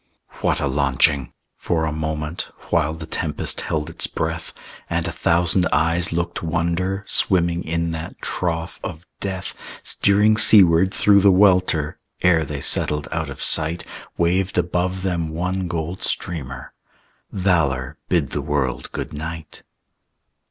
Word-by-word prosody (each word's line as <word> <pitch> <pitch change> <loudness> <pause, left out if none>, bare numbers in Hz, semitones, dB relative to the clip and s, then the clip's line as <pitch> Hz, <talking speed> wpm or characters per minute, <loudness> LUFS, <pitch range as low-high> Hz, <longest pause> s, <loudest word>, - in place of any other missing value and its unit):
What - - +1
a - - -1
launching! 70 -1 +1 0.3
For 80 -2 -1
a 80 - -2
moment, 80 +1 -4 0.2
While 80 +2 +1
the 80 0 -8
tempest 80 -1 -1
held 75 -1 -2
its - - 0
breath - - -4 0.4
And - - -1
a - - -2
thousand 90 +2 +2
eyes 85 +1 +2
looked 85 +1 -2
wonder, 85 +4 -1
Swimming 85 -3 +2
in 85 +1 -2
that 80 0 -7
trough 85 -1 -3
of 80 0 -7
death, 95 -2 -4 0.3
Steering 105 +2 +3
seaward 95 -4 +6
through 100 0 +4
the 100 0 +6
welter, 90 -5 +3 0.2
Ere 85 -3 +4
they 70 -1 -5
settled 75 +2 +1
out 80 -2 -2
of 70 - -5
sight, 80 +2 +5 0.3
Waved 90 +3 0
above 90 +2 -1
them 85 -4 -1
one 90 +3 -2
gold 85 +1 -4
streamer. 65 -7 -2 0.6
Valor, 75 -8 0
bid 80 -7 +1
the 75 - -2
world 70 -3 -2
good - - -5
night!... 80 +1 -7
85 Hz, 140 wpm, -21 LUFS, 75-90 Hz, 0.6 s, seaward